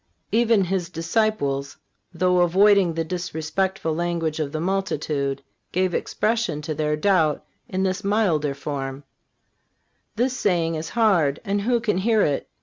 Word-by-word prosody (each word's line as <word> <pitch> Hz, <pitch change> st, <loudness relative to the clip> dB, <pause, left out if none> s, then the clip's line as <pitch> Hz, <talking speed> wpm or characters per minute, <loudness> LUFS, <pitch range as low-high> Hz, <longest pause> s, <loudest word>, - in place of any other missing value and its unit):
Even 225 Hz, -2 st, +3 dB
His 180 Hz, -2 st, -2 dB
disciples, 165 Hz, -6 st, -1 dB, 0.3 s
though 180 Hz, +1 st, +2 dB
avoiding 185 Hz, 0 st, +4 dB
the 165 Hz, -, 0 dB
disrespectful 175 Hz, +1 st, -2 dB
language 165 Hz, -1 st, -2 dB
of 150 Hz, -2 st, -2 dB
the 155 Hz, -, -3 dB
multitude, 155 Hz, -7 st, -1 dB, 0.3 s
gave 185 Hz, 0 st, 0 dB
expression 220 Hz, -8 st, -1 dB
to 155 Hz, 0 st, -3 dB
their 150 Hz, 0 st, 0 dB
doubt 160 Hz, -2 st, +2 dB, 0.2 s
in 190 Hz, -2 st, -1 dB
this 190 Hz, 0 st, -1 dB
milder 180 Hz, -9 st, +1 dB
form: 140 Hz, -1 st, -5 dB, 1.1 s
"This 250 Hz, +3 st, 0 dB
saying 175 Hz, -8 st, +1 dB
is 160 Hz, 0 st, -4 dB
hard, 175 Hz, -11 st, +3 dB
and 200 Hz, 0 st, 0 dB
who 240 Hz, +3 st, +1 dB
can 210 Hz, -5 st, 0 dB
hear 220 Hz, +1 st, +3 dB
it?" 140 Hz, -2 st, -1 dB
175 Hz, 140 wpm, -23 LUFS, 155-200 Hz, 1.1 s, avoiding